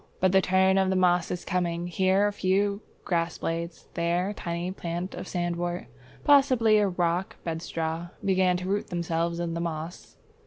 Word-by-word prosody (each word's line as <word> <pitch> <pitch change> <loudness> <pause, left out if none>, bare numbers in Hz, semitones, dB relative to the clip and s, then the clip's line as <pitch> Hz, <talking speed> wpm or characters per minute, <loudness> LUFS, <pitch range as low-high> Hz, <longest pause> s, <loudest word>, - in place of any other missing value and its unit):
But 185 0 +3
the 190 0 +5
turn 190 +1 +3
of 190 -1 +2
the 190 - +1
moss 180 -1 +3
is 180 - -4
coming. 175 -2 -1
Here 190 +3 +2
a 205 - 0
few 200 +2 +1 0.2
grass 170 -2 0
blades, 170 +1 -4
there 170 +3 0
a - - -3
tiny 170 -2 -3
plant 175 0 -4
of - - -7
Sandwort, 175 0 -2 0.4
possibly 255 -7 +5
a 205 - +3
Rock 175 0 -1
Bedstraw, 165 0 -3 0.2
begin 185 -2 +3
to 180 +1 -5
root 200 +2 -1
themselves 170 -1 -1
in 170 -1 -2
the 170 - -2
moss. 165 0 -6
180 Hz, 170 wpm, -27 LUFS, 170-190 Hz, 0.4 s, the